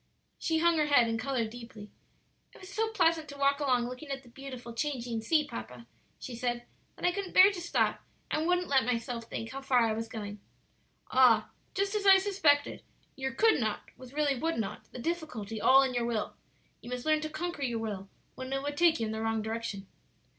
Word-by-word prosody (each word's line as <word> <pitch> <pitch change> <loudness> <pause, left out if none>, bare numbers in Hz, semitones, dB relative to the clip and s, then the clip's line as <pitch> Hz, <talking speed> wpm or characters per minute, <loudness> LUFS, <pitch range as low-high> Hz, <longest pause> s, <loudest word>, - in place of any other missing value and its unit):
She 320 - 0
hung 340 0 +3
her 300 - +2
head 265 -5 +5
and 225 0 -1
colored 235 -3 -1
deeply. 230 -3 -10 0.6
"It - - -14
was 375 +1 -11
so 445 +1 +1
pleasant 330 -7 +2
to 285 - -9
walk 280 0 +2
along 255 -4 +2
looking 255 +4 -8
at 270 0 -4
the 245 - -16
beautiful, 255 -2 -9
changing 240 -4 -2
sea, 300 +6 +2
papa," 115 +2 -8 0.3
she 250 - -7
said, 240 0 -2 0.3
"that - - -5
I 355 - +4
couldn't 385 0 -5
bear 380 +2 +9
to 370 -3 -6
stop, 345 - 0 0.3
and 310 +2 0
wouldn't 360 0 +2
let 270 -2 +3
myself 230 0 -2
think 225 0 -6
how 270 - -6
far 255 -3 +3
I 220 - +1
was 225 +1 -3
going." 210 -3 -7 0.7
"Ah, 240 -4 +5 0.2
just 395 0 0
as 415 -2 0
I 385 0 +10
suspected; 350 -8 +2 0.3
your 265 0 -3
could 445 +5 +4
not 215 -3 -3
was 255 -1 -12
really 290 -1 +1
would 325 +6 -1
not; 220 -4 -4
the - - -9
difficulty 245 -8 -4
all 265 +4 +7
in 260 -1 -1
your 240 -1 0
will. 225 -3 -2 0.5
You - - -10
must 250 0 -4
learn 310 -1 +3
to 310 - -3
conquer 315 0 -4
your 240 -4 -1
will 205 -3 -5 0.2
when 260 0 -7
it 270 0 -1
would 290 0 -4
take 335 -1 +4
you 225 - 0
in 215 - -3
the 220 0 -3
wrong 225 -1 0
direction. 220 -3 -4
260 Hz, 215 wpm, -30 LUFS, 230-310 Hz, 0.7 s, I